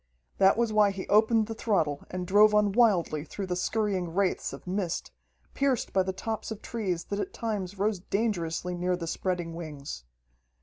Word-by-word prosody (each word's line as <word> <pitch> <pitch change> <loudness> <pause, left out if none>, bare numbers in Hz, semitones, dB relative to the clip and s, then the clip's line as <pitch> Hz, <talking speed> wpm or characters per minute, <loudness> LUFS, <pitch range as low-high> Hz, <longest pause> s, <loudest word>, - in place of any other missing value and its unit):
That 195 +2 +5
was 230 -2 +1
why 210 -1 +5
he 195 -1 -5
opened 220 +1 +4
the 225 - -5
throttle 165 -11 0
and 180 0 -4
drove 210 +3 +5
on 210 -1 +4
wildly 190 -9 +3
through 195 +5 -5
the 180 -1 -2
scurrying 190 -2 -1
wraiths 195 -1 +1
of - - -10
mist, 185 -2 -2 0.4
pierced 275 -4 0
by 190 - +4
the 190 0 -1
tops 220 +3 -4
of 220 -1 -7
trees 185 -7 -2
that 200 - -4
at 380 - -3
times 205 -5 -3
rose 205 0 0
dangerously 180 -4 -1
near 180 +1 0
the 175 -1 -5
spreading 175 0 -2
wings. 145 - -7
195 Hz, 180 wpm, -28 LUFS, 175-215 Hz, 0.4 s, That